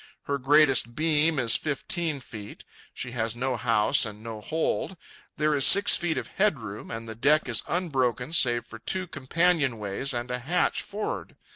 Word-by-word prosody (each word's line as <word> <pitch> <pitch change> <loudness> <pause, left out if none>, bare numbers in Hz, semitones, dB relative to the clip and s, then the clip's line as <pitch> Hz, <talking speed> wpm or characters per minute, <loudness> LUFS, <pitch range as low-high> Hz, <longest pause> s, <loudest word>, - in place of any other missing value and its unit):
Her 140 0 -2
greatest 135 -4 +3
beam 155 +1 +1
is 120 -3 +3
fifteen 155 0 -3
feet. 105 -4 -10 0.3
She 125 - -6
has 115 -2 -3
no 130 +1 -2
house 115 +2 +2
and 105 -1 -5
no 110 -2 -7
hold. 160 - -2 0.4
There 150 0 +1
is 140 -2 +2
six 200 +8 +7
feet 170 -3 -1
of - - -4
headroom, 125 - -2
and 115 0 -6
the 110 - -6
deck 145 +7 +2
is 120 - +1
unbroken 130 -6 -1
save 120 -7 +3
for 110 - -11
two 185 +10 -1
companionways 140 - 0
and 120 0 -3
a 125 - -2
hatch 155 +9 0
for'ard. 210 +1 -6
135 Hz, 165 wpm, -26 LUFS, 115-160 Hz, 0.4 s, six